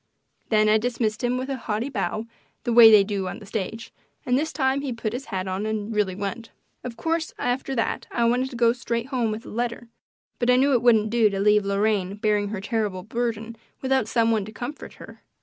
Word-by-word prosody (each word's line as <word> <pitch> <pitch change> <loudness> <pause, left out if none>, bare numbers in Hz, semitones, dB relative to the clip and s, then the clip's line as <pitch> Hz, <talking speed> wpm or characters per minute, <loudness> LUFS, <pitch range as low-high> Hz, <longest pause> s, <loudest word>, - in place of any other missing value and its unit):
Then 215 -1 +3
I 215 +1 +4
dismissed 230 -1 -2
him 245 +1 +1
with 255 +1 -3
a 270 -1 -3
haughty 225 +1 -3
bow, 220 -3 -2 0.4
the 240 - -1
way 230 -1 +10
they 210 -2 +7
do 195 -2 -3
on - - -5
the 210 - -12
stage, 220 +2 -5 0.3
and 250 -2 +2
this 310 +4 0
time 270 -2 0
he 280 -2 -3
put 230 -2 -3
his 260 +3 -5
hat 190 -4 -4
on 190 +3 -2
and 215 0 -3
really 205 -3 0
went. 205 +4 -5 0.3
Of 240 -2 -7
course 325 0 -2
after 260 +2 -2
that 230 - -2
I 235 - 0
wanted 250 +3 +1
to 260 - -9
go 235 -1 +3
straight 235 0 -3
home 245 -5 0
with 215 +2 -4
the - - -11
letter, 235 0 -3 0.5
but 240 - +1
I 250 - +6
knew 275 +2 +3
it 245 - +3
wouldn't 220 -3 +4
do 230 -2 +4
to 195 -1 -3
leave 210 0 +3
Lorraine 200 -1 0
bearing 210 -1 +1
her 205 -1 -5
terrible 205 -4 -2
burden 230 0 -3 0.3
without 265 0 +1
some 230 -1 +2
one 220 -3 +1
to 215 - -9
comfort 245 +7 -7
her. - - -13
230 Hz, 225 wpm, -24 LUFS, 210-245 Hz, 0.5 s, way